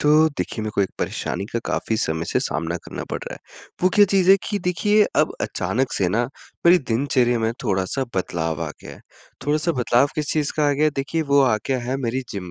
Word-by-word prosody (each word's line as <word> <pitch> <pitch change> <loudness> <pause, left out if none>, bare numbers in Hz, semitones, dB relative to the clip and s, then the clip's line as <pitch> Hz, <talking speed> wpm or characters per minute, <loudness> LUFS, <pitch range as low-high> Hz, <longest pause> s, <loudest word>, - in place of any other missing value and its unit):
तो 155 +2 +5
देखिए, 130 -6 -4
मेरे 110 - -3
को - - +1
एक 95 - 0
परेशानी 95 - -3
का 115 - 0
काफ़ी 110 - -1
समय 80 -4 0
से - - 0
सामना 80 +2 -1
करना - - -6
पड़ - - -2
रहा - - -6
है, - - -13 0.4
वो 185 - +5
क्या 205 - +7
चीज़ 190 -1 +3
है 195 - +9
कि 205 - -1
देखिए 205 +4 +2
अब - - +3
अचानक 115 +9 -1
से 95 - +1
ना 115 +6 +1 0.4
मेरी 175 +1 +7
दिनचर्या 125 -2 +1
में 115 0 0
थोड़ा-सा 95 +5 0
बदलाव 80 -4 -2
आ - - -5
गया - - -9
है, - - -17 0.5
थोड़ा-सा 155 +3 +1
बदलाव 125 -1 +3
किस 150 -2 -1
चीज़ 150 -2 0
का 150 -1 +3
आ - - +3
गया 145 +2 +1
है, 155 - +4
देखिए 140 +4 -1
वो 140 0 +6
आ 125 -5 +3
गया 135 -1 0
है 130 +2 -1
मेरी 130 0 -2
जिम 95 -4 -6
130 Hz, 230 wpm, -22 LUFS, 105-155 Hz, 0.5 s, है